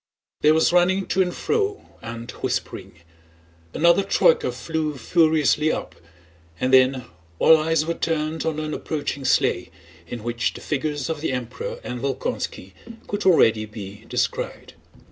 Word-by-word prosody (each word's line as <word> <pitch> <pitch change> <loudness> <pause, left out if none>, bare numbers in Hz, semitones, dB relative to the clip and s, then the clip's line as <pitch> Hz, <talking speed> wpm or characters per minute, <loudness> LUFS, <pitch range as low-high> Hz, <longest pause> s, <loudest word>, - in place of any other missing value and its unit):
There 155 +1 +5
was 160 - +3
running 185 +2 +3
to 190 - +2
and 180 -1 +1
fro 415 - -1 0.2
and 115 +1 -7
whispering; - - -3 0.8
another 170 - +4
troyka 470 - +3
flew 155 -3 -3
furiously 155 +2 +2
up, - - -4 0.7
and 130 +1 0
then 130 -1 +4 0.3
all 160 - +7
eyes 160 0 +1
were 170 - -1
turned 160 -1 -2
on 160 -2 -1
an 155 0 -3
approaching 145 -3 -4
sleigh 130 - +2 0.4
in 115 +3 -7
which 120 -1 -1
the - - -9
figures 145 -1 -2
of 160 -2 -3
the 160 - -1
Emperor 125 -1 -5
and 125 -1 -5
Volkónski 110 -7 -3 0.3
could 205 -1 -2
already 110 -11 +4
be 105 -1 -9
descried. - - -3
155 Hz, 145 wpm, -23 LUFS, 125-165 Hz, 0.8 s, all